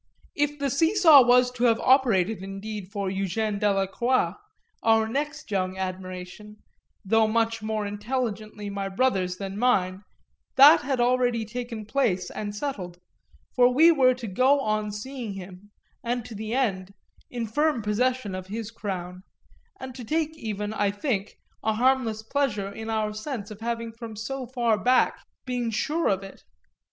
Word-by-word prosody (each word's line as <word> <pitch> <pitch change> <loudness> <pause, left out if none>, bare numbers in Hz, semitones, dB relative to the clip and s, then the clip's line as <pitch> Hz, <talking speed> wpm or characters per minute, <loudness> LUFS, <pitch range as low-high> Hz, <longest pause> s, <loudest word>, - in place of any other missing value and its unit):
If 290 0 0
the 280 -2 -1
see 325 +8 +2
saw 320 -8 +8
was 250 0 +4
to 250 0 -1
have 230 -1 +4
operated 225 -7 +3
indeed 195 +1 -6
for 200 -2 -2
Eugène 195 +2 -2
Delacroix, 205 +5 +1 0.5
our 225 -1 +3
next 295 +2 -4
young 185 -1 -1
admiration, 185 +2 -6 0.5
though 220 +2 +3
much 225 0 0
more 215 -1 -2
intelligently 215 -1 -4
my 200 -1 -3
brother's 190 -5 0
than 195 +1 -5
mine, 190 -6 +1 0.5
that 295 +4 +8
had 265 -1 -2
already 245 -2 +2
taken 235 -1 -6
place 215 -7 0
and 205 -1 -5
settled, 200 -9 -5 0.6
for 250 -1 +5
we 320 +7 +6
were 255 -5 +4
to 245 -1 -8
go 255 +8 +3
on 215 -2 -1
seeing 230 +1 -6
him, 190 +1 -10 0.3
and 240 -1 -2
to 240 - -9
the 220 +2 -4
end, 195 -7 -1 0.3
in 240 -2 -3
firm 295 +2 0
possession 225 0 0
of 185 0 -6
his 220 +2 -5
crown, 185 -4 -5 0.6
and 260 -1 -7
to 250 0 -8
take 315 +5 -1
even, 210 -6 -4
I 205 -2 +1
think, 205 -1 -3 0.2
a 220 - +1
harmless 235 -2 +1
pleasure 220 -6 -1
in 220 +2 -7
our 215 -1 -1
sense 215 -1 -5
of 215 +1 -10
having 230 0 -3
from 225 -1 -9
so 255 +4 -5
far 235 -4 +1
back 250 +1 +3 0.3
been 245 -2 -2
sure 300 +9 0
of 195 0 +1
it. 195 - -12
220 Hz, 160 wpm, -26 LUFS, 200-255 Hz, 0.6 s, saw